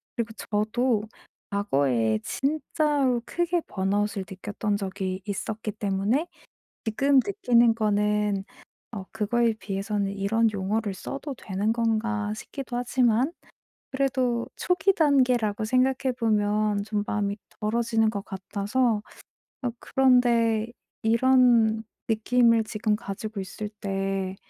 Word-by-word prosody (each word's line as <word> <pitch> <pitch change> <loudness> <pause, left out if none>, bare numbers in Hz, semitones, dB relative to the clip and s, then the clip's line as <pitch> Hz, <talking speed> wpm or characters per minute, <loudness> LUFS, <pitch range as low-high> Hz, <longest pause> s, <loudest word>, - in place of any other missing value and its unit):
그리고 230 -2 -2
저도 215 +2 0 0.5
과거에 135 - +1
진짜로 285 -3 0
크게 345 0 0
번아웃을 200 +1 -1
느꼈던 205 +2 -3
적이 190 -1 -4
있었기 215 +1 -4
때문에 205 - 0 0.6
지금 275 +6 +2
느끼는 240 - +3
거는 210 -2 +1 0.5
어 200 -4 -5
그거에 225 +2 +1
비해서는 200 0 -2
'이런 215 +3 +1
용어를 205 +2 -1
써도 275 +8 -6
되는 205 +3 -1
건가.' 225 -2 0
싶기도 245 +2 -6
하지만 245 +2 +2 0.6
그래도 260 -3 0
초기 370 +2 +2
단계라고 250 - +2
생각해 255 +2 +2
보면 210 -2 +1
좀 210 -1 -1
마음이 205 -1 -1 0.2
덜어지는 225 0 +1
것 200 -2 -4
같아서 210 +4 -1 0.6
아 250 -3 -1
그런데 235 -4 +3 0.4
이런 230 -1 +4 0.2
느낌을 230 +1 +3
지금 215 0 0
가지고 215 -1 -6
있을 200 +2 -6
때 195 -2 -3
220 Hz, 250 characters per minute, -26 LUFS, 205-245 Hz, 0.6 s, 이런